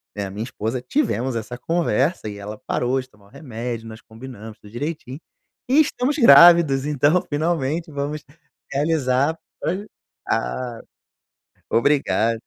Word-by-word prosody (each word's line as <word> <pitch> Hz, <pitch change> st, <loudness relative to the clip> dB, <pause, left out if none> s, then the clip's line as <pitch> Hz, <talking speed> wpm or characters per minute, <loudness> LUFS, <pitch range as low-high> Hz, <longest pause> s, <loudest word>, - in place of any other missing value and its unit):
né, 100 Hz, -1 st, -3 dB
a 95 Hz, -, -7 dB
minha 105 Hz, +3 st, -4 dB
esposa, 120 Hz, 0 st, -4 dB
tivemos 130 Hz, -, -1 dB
essa 115 Hz, +2 st, -5 dB
conversa 155 Hz, -4 st, 0 dB
e 100 Hz, -, -8 dB
ela 105 Hz, +1 st, -7 dB
parou 125 Hz, +2 st, 0 dB
de 130 Hz, -, -16 dB
tomar 105 Hz, -3 st, -23 dB
o -, -, -22 dB
remédio, 115 Hz, -4 st, -6 dB
nós 110 Hz, 0 st, -10 dB
combinamos 110 Hz, -2 st, -11 dB
tudo 105 Hz, -, -15 dB
direitinho, 145 Hz, +1 st, -5 dB, 0.5 s
e 280 Hz, +4 st, +5 dB
estamos 290 Hz, -1 st, +1 dB
grávidos, 170 Hz, -, +7 dB
então, 150 Hz, +4 st, +2 dB
finalmente, 155 Hz, +1 st, -1 dB
vamos 145 Hz, +1 st, -4 dB, 0.5 s
realizar, 145 Hz, 0 st, +1 dB, 0.3 s
olha 195 Hz, +5 st, -2 dB, 0.4 s
ah, 115 Hz, -, -2 dB, 0.9 s
obrigado 115 Hz, -4 st, +2 dB
130 Hz, 135 wpm, -22 LUFS, 115-160 Hz, 0.9 s, grávidos